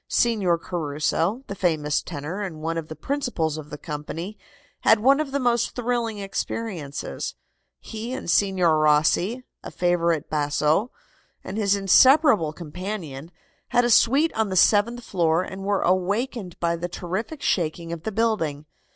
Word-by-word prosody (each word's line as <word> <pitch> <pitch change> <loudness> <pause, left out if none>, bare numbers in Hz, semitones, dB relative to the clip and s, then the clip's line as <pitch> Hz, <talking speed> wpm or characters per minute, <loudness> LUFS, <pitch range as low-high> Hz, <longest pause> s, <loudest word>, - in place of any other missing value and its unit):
Signor 205 -8 +2
Caruso, 165 - -1
the 200 - -6
famous 155 -6 0
tenor 155 +8 -6
and 180 -6 -5
one 165 +1 -2
of 165 -2 -4
the 155 - -8
principals 170 - -2
of 150 -1 -10
the 150 - -7
company, 165 +6 -6 0.4
had 220 - +4
one 270 +6 +4
of 310 -2 -1
the 280 - 0
most 240 -3 +1
thrilling 240 -2 -1
experiences. 195 -6 -4 0.4
He 225 +2 -7
and 260 - -5
Signor 175 -3 +3
Rossi, 155 +10 +2 0.2
a - - -8
favorite 170 -3 0
basso, 150 +7 +1 0.5
and 190 - -6
his 205 -2 +2
inseparable 215 - +5
companion, 165 -2 -6 0.4
had 245 0 +2
a 240 - +2
suite 275 +8 +4
on 220 -2 0
the 190 - -3
seventh 220 +6 +3
floor 170 -3 +1
and 190 +1 -7
were 200 0 +1
awakened 190 +2 -1
by 170 0 0
the 175 +1 -4
terrific 195 - -5
shaking 170 -1 -1
of 170 - -6
the 220 - -4
building. 195 -10 -1
185 Hz, 150 wpm, -24 LUFS, 160-225 Hz, 0.5 s, inseparable